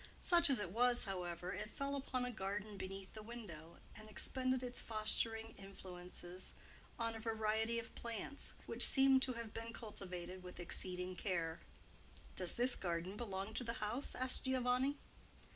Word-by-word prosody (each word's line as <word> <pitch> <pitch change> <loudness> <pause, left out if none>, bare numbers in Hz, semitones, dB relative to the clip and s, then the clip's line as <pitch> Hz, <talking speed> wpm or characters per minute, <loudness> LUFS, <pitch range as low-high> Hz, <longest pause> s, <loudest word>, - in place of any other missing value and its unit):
Such 340 -3 +5
as 270 - +5
it 185 -4 -3
was, 245 +3 +4
however, 180 -2 -3
it 210 - -4
fell 280 0 -1
upon 255 -2 -1
a 250 - -2
garden 205 0 -3
beneath 195 0 -6
the 215 - -7
window 195 -8 -9 0.2
and 215 0 -11
expended 255 +4 +1
its 245 -1 -3
fostering 225 0 +2
influences 180 -2 -8 0.4
on 230 -1 0
a 225 - -6
variety 220 0 0
of 230 - -4
plants, 235 +5 -5
which - - +6
seemed 270 -1 +8
to 260 -1 +1
have 230 -2 -6
been 230 +1 -5
cultivated 185 -4 -5
with 180 -1 -9
exceeding 180 +1 -1
care. 170 -4 -1 0.8
"Does 180 -2 +2
this 245 +1 +4
garden 175 +1 -2
belong 200 -2 -4
to - - -1
the 230 -1 -2
house?" 230 +5 -2
asked 255 +1 +2
Giovanni. 260 +2 +2
215 Hz, 160 wpm, -39 LUFS, 185-245 Hz, 0.8 s, seemed